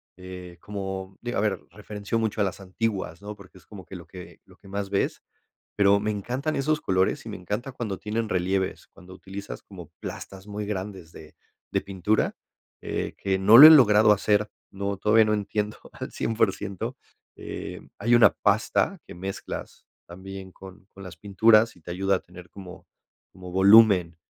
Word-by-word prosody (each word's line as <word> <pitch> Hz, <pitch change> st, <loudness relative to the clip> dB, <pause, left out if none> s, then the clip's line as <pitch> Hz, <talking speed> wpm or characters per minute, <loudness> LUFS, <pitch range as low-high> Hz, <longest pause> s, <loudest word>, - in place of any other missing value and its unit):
eh, 90 Hz, -1 st, -10 dB
como 95 Hz, -2 st, -6 dB
digo 120 Hz, -2 st, -3 dB
a -, -, +1 dB
ver, 105 Hz, -2 st, 0 dB
referenció 105 Hz, +1 st, -4 dB
mucho 110 Hz, -1 st, -2 dB
a -, -, +3 dB
las 95 Hz, 0 st, -3 dB
antiguas, 95 Hz, -3 st, -4 dB
¿no? 105 Hz, 0 st, -7 dB
Porque 95 Hz, -2 st, -16 dB
es -, -, -20 dB
como 100 Hz, -4 st, -11 dB
que 95 Hz, -, -10 dB
lo 85 Hz, -, -10 dB
que 90 Hz, 0 st, -12 dB
lo -, -, -20 dB
que 100 Hz, -, -19 dB
más 100 Hz, 0 st, -5 dB
ves. 100 Hz, -, -1 dB, 0.5 s
Pero 100 Hz, 0 st, +4 dB
me 105 Hz, +1 st, -2 dB
encantan 125 Hz, +9 st, -3 dB
esos 150 Hz, +3 st, 0 dB
colores 95 Hz, 0 st, 0 dB
y -, -, -6 dB
me -, -, -6 dB
encanta 105 Hz, +9 st, -4 dB
cuando 110 Hz, -6 st, -5 dB
tienen 110 Hz, +2 st, -3 dB
relieves, 95 Hz, 0 st, -1 dB
cuando 90 Hz, +1 st, -15 dB
utilizas 100 Hz, +1 st, -9 dB
como 90 Hz, -6 st, -13 dB
plastas 95 Hz, +1 st, -9 dB
muy 105 Hz, 0 st, -5 dB
grandes 95 Hz, -4 st, -6 dB
de 75 Hz, -, -14 dB, 0.3 s
de -, -, 0 dB
pintura, 100 Hz, +2 st, -1 dB, 0.5 s
eh, -, -, -4 dB
que 95 Hz, -1 st, -1 dB
no 110 Hz, +6 st, +7 dB
lo 150 Hz, -, +13 dB
he -, -, +11 dB
logrado 110 Hz, -8 st, +7 dB
hacer, 105 Hz, +1 st, +1 dB, 0.2 s
no, 100 Hz, 0 st, -3 dB
todavía 110 Hz, +2 st, +4 dB
no 105 Hz, -, +1 dB
entiendo, 105 Hz, +1 st, -3 dB
al -, -, -8 dB
100% 100 Hz, -3 st, -2 dB, 0.4 s
Eh, -, -, -7 dB, 0.2 s
hay 120 Hz, -, +1 dB
una 120 Hz, -, +7 dB
pasta 110 Hz, -, 0 dB
que -, -, -11 dB
mezclas 95 Hz, +2 st, -7 dB, 0.2 s
también 95 Hz, +2 st, -10 dB
con 95 Hz, +1 st, -14 dB
con 100 Hz, -, -13 dB
las 90 Hz, -3 st, -10 dB
pinturas 110 Hz, +4 st, +3 dB
y 90 Hz, -, -21 dB
te 80 Hz, -, -12 dB
ayuda 95 Hz, +2 st, +1 dB
a -, -, -9 dB
tener 90 Hz, 0 st, -14 dB
como 95 Hz, -2 st, -12 dB, 0.5 s
como 90 Hz, -1 st, -11 dB
volumen. 95 Hz, -3 st, +6 dB
100 Hz, 180 wpm, -25 LUFS, 95-105 Hz, 0.5 s, lo